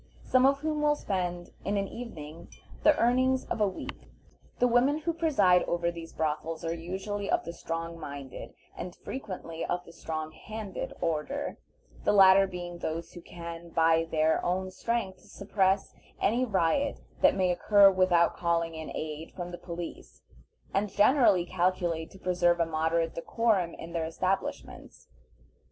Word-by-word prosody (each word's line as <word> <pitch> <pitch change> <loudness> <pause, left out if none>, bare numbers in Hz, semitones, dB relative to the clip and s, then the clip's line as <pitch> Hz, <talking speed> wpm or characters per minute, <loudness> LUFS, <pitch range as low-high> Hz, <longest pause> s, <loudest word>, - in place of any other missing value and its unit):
some 255 +1 +4
of 275 0 +2
whom 305 -1 -1
will 295 0 +3
spend 175 -7 -3
in 200 +1 0
an 195 0 0
evening 170 -9 -8 0.3
the 305 -1 +5
earnings 255 +2 +2
of - - -3
a 210 - +5
week. 190 - -7 0.5
The 250 - +4
women 250 +5 +3
who 330 +2 -2
preside 235 - +4
over 170 0 0
these 165 -1 -9
brothels 160 +1 -2
are 165 - -1
usually 190 +4 -4
of - - +1
the 170 - -5
strong 165 0 -5
minded, 140 -4 -8 0.2
and 180 0 -6
frequently 185 -9 -6
of 180 0 -2
the 170 - -13
strong 155 -1 -5
handed 215 +2 -6
order, 165 - -2 0.4
the - - +3
latter 195 -1 +7
being 175 -1 -7
those 165 +1 -4
who 175 - -9
can 170 0 -8
by 165 0 +3
their 160 0 +2
own 185 +1 -1
strength 195 -1 -2
suppress 195 -1 0 0.3
any 245 +4 +2
riot 215 +7 +1 0.2
that - - +5
may 185 -2 +2
occur 200 +2 +6
without 185 -2 +3
calling 170 -1 0
in 160 -1 -6
aid 155 +1 -5
from 175 -1 -5
the 175 - -6
police, 170 -1 -8 0.5
and 200 +1 +1
generally 205 -5 +4
calculate 175 -2 0
to - - -14
preserve 175 -2 +2
a 170 - +3
moderate 165 +1 0
decorum 195 -1 0
in 165 +1 -9
their 165 -1 -1
establishments. 185 +4 -4
180 Hz, 155 wpm, -29 LUFS, 165-205 Hz, 0.5 s, latter